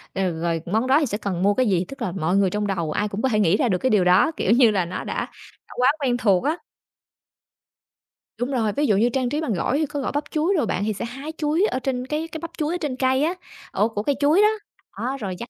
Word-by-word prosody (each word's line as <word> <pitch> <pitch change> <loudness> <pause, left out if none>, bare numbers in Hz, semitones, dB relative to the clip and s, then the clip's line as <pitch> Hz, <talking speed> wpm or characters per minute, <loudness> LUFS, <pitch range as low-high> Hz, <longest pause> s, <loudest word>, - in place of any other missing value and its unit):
Rồi 190 -2 0
rồi 165 -1 -1
món 220 +8 0
đó 275 +3 +5
thì 300 - +1
sẽ 205 -5 -3
cần 190 -4 -3
mua 205 +1 +4
cái 255 +4 +1
gì, 185 -3 +1
tức 275 - -11
là 180 - -1
mọi 180 +1 0
người 195 -2 +3
trong 210 +2 -2
đầu 170 -6 -2
ai 210 - 0
cũng 205 +1 -5
có 265 - +1
thể 215 -3 +1
nghĩ 195 -1 +3
ra 245 - +1
được 185 - +2
cái 260 - 0
điều 210 -5 +3
đó, 180 - +4
kiểu 190 - +1
như 235 -1 +6
là, 190 -4 0
nó 180 - -5
đã - - -3 0.4
đã - - -12
quá 250 +2 +4
quen 250 -3 +1
thuộc 200 -7 +2
á. 310 +4 0 1.8
Đúng 245 +3 -2
rồi, 225 -6 0
ví 295 +5 0
dụ 205 -3 +3
như 235 +3 +3
trang 255 0 -1
trí 295 +4 -2
bằng 285 -9 -1
gỏi 200 +9 0
thì 315 - +1
có 290 0 -5
gỏi 265 - -2
bắp 290 +1 -1
chuối 320 +6 +1
đồ 295 - +1
bạn, 200 -2 -1
thì 215 - 0
sẽ 220 - -5
hái 270 +6 -7
chuối 310 +6 +1
ở 255 - -1
trên 255 -1 -2
cái 305 +3 -2
cái 320 - -5
bắp 335 - -6
chuối 310 +2 -1
ở - - -1
trên 290 -5 -2
cây 260 +2 +1
á, 335 - +1 0.4
ổ 210 +4 +1
của 210 -2 -4
cây 285 +4 +1
chuối 300 +7 +4
đó, 425 - +6 0.5
đó 260 +3 -2
rồi 190 -5 -4
vắt 235 - -7
240 Hz, 285 wpm, -23 LUFS, 195-285 Hz, 1.8 s, như